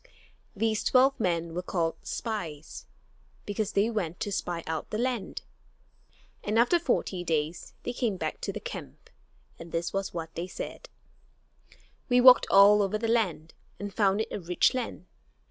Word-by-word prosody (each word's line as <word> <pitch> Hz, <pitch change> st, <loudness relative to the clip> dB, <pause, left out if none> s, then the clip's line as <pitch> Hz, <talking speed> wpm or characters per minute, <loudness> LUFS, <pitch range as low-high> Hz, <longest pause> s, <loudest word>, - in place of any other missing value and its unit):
These 220 Hz, +1 st, 0 dB
twelve 265 Hz, +1 st, +4 dB
men 170 Hz, -5 st, -1 dB
were 180 Hz, -, -2 dB
called 170 Hz, -3 st, -1 dB
"spies," 170 Hz, -10 st, -5 dB, 0.6 s
because 205 Hz, 0 st, -2 dB
they 200 Hz, +2 st, +3 dB
went 180 Hz, -6 st, -3 dB
"to 205 Hz, -, -2 dB
spy 175 Hz, -4 st, -3 dB
out 160 Hz, -1 st, -4 dB
the 215 Hz, -, -3 dB
land"; 245 Hz, -3 st, -2 dB, 1.0 s
and 210 Hz, +2 st, 0 dB
after 245 Hz, +9 st, +4 dB
forty 200 Hz, -, -1 dB
days 160 Hz, 0 st, -2 dB
they 245 Hz, -, -3 dB
came 230 Hz, -6 st, -1 dB
back 155 Hz, -3 st, -4 dB
to -, -, -2 dB
the -, -, -6 dB
camp, -, -, -9 dB, 0.5 s
and 165 Hz, 0 st, -10 dB
this 165 Hz, 0 st, -2 dB
was 195 Hz, 0 st, -2 dB
what 165 Hz, -1 st, -6 dB
they 170 Hz, +2 st, -4 dB
said: -, -, -7 dB, 1.2 s
"We 245 Hz, 0 st, +5 dB
walked 250 Hz, 0 st, +8 dB
all 205 Hz, +1 st, +7 dB
over 200 Hz, +1 st, 0 dB
the 225 Hz, +1 st, -2 dB
land 190 Hz, -9 st, 0 dB, 0.3 s
and 205 Hz, -1 st, -5 dB
found 200 Hz, -1 st, +2 dB
it -, -, -5 dB
a -, -, -3 dB
rich 180 Hz, -1 st, +2 dB
land. 235 Hz, -, -4 dB
195 Hz, 165 wpm, -28 LUFS, 170-225 Hz, 1.2 s, walked